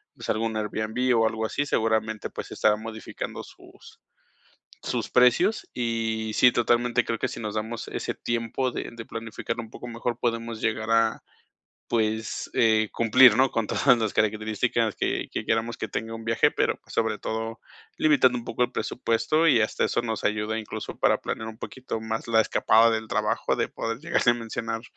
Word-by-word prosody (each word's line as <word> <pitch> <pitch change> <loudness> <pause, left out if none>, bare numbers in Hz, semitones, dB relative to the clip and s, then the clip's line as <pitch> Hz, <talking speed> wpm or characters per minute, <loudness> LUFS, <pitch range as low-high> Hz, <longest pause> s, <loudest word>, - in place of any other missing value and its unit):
pues, - - -9
algún 110 0 0
Airbnb 110 +4 -1
o 115 0 +4
algo 110 0 -2
así, 145 +6 -1
seguramente, 110 -2 0
pues, - - -6
se - - -9
estarán 105 0 +2
modificando 110 -1 -6
sus - - -16 0.8
sus - - -2
precios. 125 - +3
Y 115 -2 -2
sí, 125 - +6
totalmente 120 +1 +2
creo 115 - -2
que - - -1
si - - -7
nos 105 -2 -4
damos 110 +2 -4
ese - - -3
tiempo 120 +2 -2
de - - -5
de 115 -1 -9
planificar 115 +1 -5
un 115 - -9
poco 120 - -9
mejor, 120 0 -3
podemos 115 -1 -2
llegar 110 0 -1
a, 115 0 +2 0.7
pues, 110 -1 -1
eh, 110 -1 +3
cumplir, 115 0 +6
¿no?, 130 0 +4
con 115 -2 -1
todas 125 0 +3
las 110 -2 -1
características 110 -1 0
que - - -1
que - - -3
queramos 115 +1 0
que 110 - -4
tenga 115 +3 -4
un 115 - -7
viaje, 115 0 +3
pero, - - +1
pues, - - -13
sobre 110 -2 0
todo, 110 +1 -4 0.4
limitando 135 -5 +4
un 120 - -9
poco 120 +1 -2
el 120 - -4
presupuesto, 130 +8 +1
y 120 -6 +5
hasta - - 0
eso - - +1
nos 110 -3 -3
ayuda 105 +1 0
incluso 110 - -6
para - - +3
planear 110 0 -4
un 110 0 -10
poquito 130 -3 -6
más 110 +1 -4
la 115 -1 +4
escapada 115 +1 +4
del 110 -1 -2
trabajo, - - 0
de - - 0
poder 115 +1 -4
llegarle 145 -5 +2
a - - -2
mencionar, 115 -1 -4
115 Hz, 185 wpm, -26 LUFS, 110-120 Hz, 0.8 s, sí